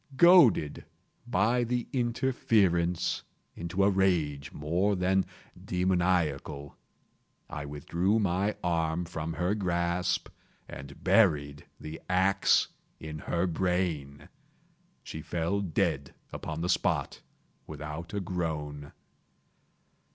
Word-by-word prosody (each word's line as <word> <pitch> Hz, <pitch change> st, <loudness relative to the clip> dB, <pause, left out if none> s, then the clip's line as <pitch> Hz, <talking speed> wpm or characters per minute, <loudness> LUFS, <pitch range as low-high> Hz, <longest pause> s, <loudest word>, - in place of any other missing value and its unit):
Goaded, 170 Hz, -, +6 dB, 0.4 s
by 115 Hz, +6 st, +2 dB
the 120 Hz, 0 st, -1 dB
interference, 105 Hz, -9 st, +1 dB, 0.3 s
into 85 Hz, +3 st, -1 dB
a 100 Hz, -, +5 dB
rage 85 Hz, -8 st, +1 dB
more 90 Hz, +7 st, 0 dB
than 95 Hz, +1 st, +1 dB, 0.4 s
demoniacal, 90 Hz, -6 st, 0 dB, 0.7 s
I 75 Hz, -1 st, -6 dB
withdrew 85 Hz, +8 st, 0 dB
my 100 Hz, 0 st, +1 dB
arm 85 Hz, 0 st, 0 dB
from 80 Hz, -1 st, -4 dB
her 90 Hz, +4 st, 0 dB
grasp 90 Hz, -3 st, 0 dB, 0.4 s
and 70 Hz, +1 st, -10 dB
buried 75 Hz, -8 st, +3 dB
the 80 Hz, +1 st, -8 dB
axe 95 Hz, +2 st, +3 dB, 0.3 s
in 75 Hz, -1 st, -7 dB
her 85 Hz, +4 st, -1 dB
brain. 85 Hz, -5 st, -1 dB, 0.8 s
She 80 Hz, -, -7 dB
fell 85 Hz, +5 st, -1 dB
dead 75 Hz, -6 st, -1 dB, 0.2 s
upon 80 Hz, 0 st, -5 dB
the 85 Hz, -, -1 dB
spot, 90 Hz, -, 0 dB, 0.5 s
without 75 Hz, +3 st, -7 dB
a 105 Hz, -, -2 dB
groan. 75 Hz, -6 st, -4 dB
90 Hz, 100 wpm, -29 LUFS, 75-95 Hz, 0.8 s, Goaded